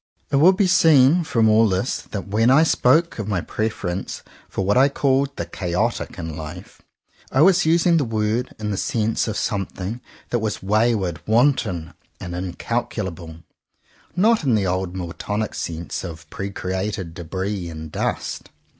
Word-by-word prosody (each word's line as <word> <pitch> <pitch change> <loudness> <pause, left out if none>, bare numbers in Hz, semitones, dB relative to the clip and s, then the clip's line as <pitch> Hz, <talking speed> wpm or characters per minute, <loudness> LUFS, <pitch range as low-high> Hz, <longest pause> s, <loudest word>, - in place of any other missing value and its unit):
It 140 - +3
will 170 +7 +7
be 195 +1 +2
seen 165 -3 +5
from 115 -7 +2
all 110 0 +5
this 95 +7 -1
that~when 105 +3 0
I 140 +5 +6
spoke 160 0 +3
of 105 - -3
my 100 -4 0
preference 95 -2 -3 0.3
for 95 - -2
what 100 - +2
I 135 +2 +5
called 140 0 +1
the - - -3
"chaotic" 95 +5 -2
in 80 -3 -5
life, 80 +4 -9 0.5
I 135 - +3
was 185 0 +5
using 170 +1 +4
the 150 - +2
word 110 +1 -1
in 105 -1 -3
the 100 - -2
sense 110 +2 0
of 110 - -2
something 100 +2 -3 0.3
that 120 - +1
was 105 -3 -3
way 110 +4 +3
ward, 90 -5 -3
wanton 110 - +1 0.3
and 90 - -6
incalculable, 90 -3 -4 0.7
not 215 +2 +3
in 130 -5 +3
the 100 -2 +1
old 95 0 -2
Miltonic 100 +4 -3
sense 85 0 -4
of 80 -3 -8
pre 100 - -4
createdj 95 -1 -3
debris 95 +2 -4
and 80 -1 -8
dust. - - -3
105 Hz, 160 wpm, -22 LUFS, 90-125 Hz, 0.7 s, will